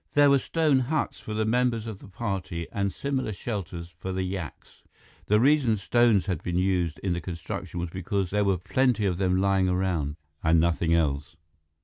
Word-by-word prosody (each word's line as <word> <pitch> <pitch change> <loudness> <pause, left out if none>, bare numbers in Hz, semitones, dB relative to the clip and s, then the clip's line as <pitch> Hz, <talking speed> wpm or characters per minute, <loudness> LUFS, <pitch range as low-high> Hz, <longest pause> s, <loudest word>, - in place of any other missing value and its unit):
There 145 -1 +6
were 140 - +5
stone 155 -2 +2
huts 140 +5 -1
for 110 - -6
the 110 0 +1
members 120 0 +1
of 110 -4 -6
the - - -13
party 95 -5 -4
and 100 -1 -1
similar 130 +2 -2
shelters 90 -5 -5
for 95 +1 -4
the 95 0 -1
yaks. 90 -4 -6 0.5
The 105 +1 +4
reason 130 -3 +4
stones 110 -2 +3
had 90 -5 -2
been 90 0 -2
used 90 -4 +1
in 95 -3 +1
the 85 - -3
construction 85 +1 -5
was 85 -1 -3
because 95 +1 -2
there 105 +1 +2
were 100 -2 +2
plenty 110 +4 +1
of 90 -2 0
them 95 -1 +2
lying 95 -1 +2
around; 90 -6 0 0.3
and 80 0 +4
nothing 85 0 +2
else. 75 -1 0
95 Hz, 190 wpm, -27 LUFS, 85-110 Hz, 0.5 s, There